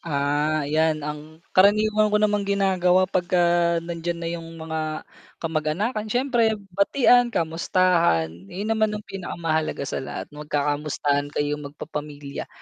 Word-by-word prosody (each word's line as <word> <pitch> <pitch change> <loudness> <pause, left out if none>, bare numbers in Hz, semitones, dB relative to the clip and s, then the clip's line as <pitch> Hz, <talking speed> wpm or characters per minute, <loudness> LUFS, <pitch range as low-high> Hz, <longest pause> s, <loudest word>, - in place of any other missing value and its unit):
Ah, 150 0 0
'yan, 155 0 +1
ang 150 +2 -8
karaniwan 215 +2 +4
ko 210 - +2
namang 210 -1 +1
ginagawa 185 -2 +3
'pag 185 -1 -1
ka 180 -1 +3 0.4
nandiyan 170 0 -3
na 170 0 -4
yung 165 -1 -6
mga 160 -1 -4 0.3
kamag-anakan, 170 +8 -2
siyempre 240 -2 +2 0.2
batian, 245 +5 +4
kamustahan, 165 - +1 0.2
yun 205 - -3
naman 215 -1 +1
ang 210 - -8
pinakamahalaga 165 -6 -2
sa - - -3
lahat 135 - -7
magkakamustahan 145 -1 -1
kayong 145 0 -2
magpapamilya, 145 -1 -7
165 Hz, 125 wpm, -24 LUFS, 150-200 Hz, 0.4 s, karaniwan